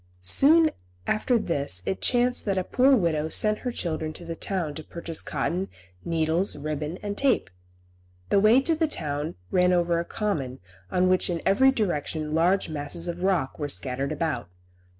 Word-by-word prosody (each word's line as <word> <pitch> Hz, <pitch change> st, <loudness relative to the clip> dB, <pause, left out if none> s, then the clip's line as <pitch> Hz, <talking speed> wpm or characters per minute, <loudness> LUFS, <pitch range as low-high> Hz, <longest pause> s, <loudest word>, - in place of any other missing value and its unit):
Soon 310 Hz, -, +5 dB, 0.3 s
after 235 Hz, +3 st, +1 dB
this 140 Hz, -, 0 dB
it 190 Hz, -, -2 dB
chanced 245 Hz, 0 st, +1 dB
that 195 Hz, -2 st, 0 dB
the 185 Hz, -, 0 dB
poor 265 Hz, +7 st, +4 dB
widow 160 Hz, -7 st, 0 dB
sent 215 Hz, +5 st, +3 dB
her 250 Hz, -, -3 dB
children 160 Hz, -6 st, -3 dB
to 170 Hz, -, -9 dB
the 165 Hz, 0 st, -5 dB
town 175 Hz, -4 st, -2 dB
to 155 Hz, -, -7 dB
purchase 170 Hz, 0 st, -6 dB
cotton, 185 Hz, +3 st, -2 dB, 0.3 s
needles, 165 Hz, +3 st, 0 dB
ribbon 150 Hz, +3 st, -4 dB
and 205 Hz, 0 st, -3 dB
tape. 265 Hz, -, +1 dB, 0.8 s
The 200 Hz, -, +4 dB
way 220 Hz, +6 st, +5 dB
to 325 Hz, +4 st, +1 dB
the 320 Hz, 0 st, +1 dB
town 150 Hz, -, -4 dB, 0.2 s
ran 180 Hz, 0 st, +3 dB
over 175 Hz, -1 st, +2 dB
a 170 Hz, -, -3 dB
common 155 Hz, -, -3 dB, 0.3 s
on 180 Hz, 0 st, +2 dB
which 185 Hz, 0 st, +2 dB
in 170 Hz, -1 st, -1 dB
every 240 Hz, +8 st, +5 dB
direction 160 Hz, -, -1 dB
large 175 Hz, +5 st, +2 dB
masses 155 Hz, +3 st, -4 dB
of 175 Hz, 0 st, -4 dB
rocks 180 Hz, -9 st, 0 dB
were 145 Hz, -1 st, -3 dB
scattered 135 Hz, +1 st, -1 dB
about. 155 Hz, -, -2 dB
170 Hz, 170 wpm, -26 LUFS, 155-210 Hz, 0.8 s, Soon